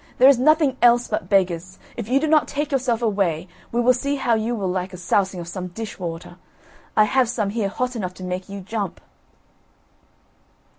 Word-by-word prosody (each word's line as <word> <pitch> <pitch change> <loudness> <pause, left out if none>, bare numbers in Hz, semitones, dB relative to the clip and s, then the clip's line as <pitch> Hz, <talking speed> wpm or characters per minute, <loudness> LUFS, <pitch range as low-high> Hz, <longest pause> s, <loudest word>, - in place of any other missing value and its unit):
there 255 - +7
is 275 -3 +6
nothing 300 -1 +3
else 240 0 +5
but 180 - -3
beggars; 185 -2 +1 0.2
if 230 -2 -6
you 265 +2 +4
do 310 - 0
not 310 0 +3
take 295 +1 -3
yourself 250 -4 0
away, 195 -6 0 0.2
we 235 - 0
will 245 +1 +5
see 280 +3 -1
how 245 -4 +1
you 225 +2 0
will 200 -4 -2
like 185 +1 -2
a - - -7
sousing 190 +1 0
of 170 - -7
some 180 +1 -5
dish 220 +4 -7
water; 170 -2 -6 0.6
I 215 - +7
have 245 +3 +2
some 215 -5 -1
here 210 -2 -1
hot 250 +4 -3
enough 185 -5 -4
to 185 - -10
make 180 +1 -4
you 200 0 -6
jump." 200 -1 -4
215 Hz, 200 wpm, -22 LUFS, 185-250 Hz, 0.6 s, there